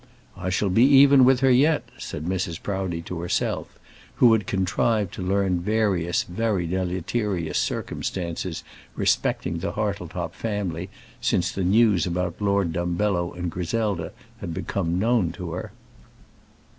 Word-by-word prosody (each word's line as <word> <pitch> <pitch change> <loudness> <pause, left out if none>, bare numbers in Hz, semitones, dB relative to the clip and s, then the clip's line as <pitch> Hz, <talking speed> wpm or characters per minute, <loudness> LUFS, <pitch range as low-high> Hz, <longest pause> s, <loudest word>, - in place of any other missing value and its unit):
"I 95 0 -4
shall 95 +2 +1
be 110 - +4
even 135 -1 +7
with 130 0 +4
her 135 -1 +5
yet," 145 +5 +4 0.2
said 75 - -6
Mrs. 90 -2 -2
Proudie 95 -4 -3
to 90 0 -6
herself, 85 +1 -2 0.4
who 120 -2 +6
had 110 -4 +1
contrived 100 +1 0
to - - -6
learn 95 -1 +1
various 95 -4 +1
very 100 -1 -1
deleterious 90 -1 -1
circumstances 85 -1 -3 0.3
respecting 85 - 0
the 95 - -3
Hartletop 100 -5 -3
family 95 -5 -3 0.3
since 90 0 +1
the 95 - -3
news 100 -2 +4
about 90 +1 -2
Lord 100 -4 +1
Dumbello 85 +1 0
and 90 -1 -3
Griselda 90 0 -2 0.3
had 85 - -5
become 85 -1 -2
known 110 -4 +2
to 90 -2 -6
her. 90 +2 -5
95 Hz, 135 wpm, -24 LUFS, 85-105 Hz, 0.4 s, even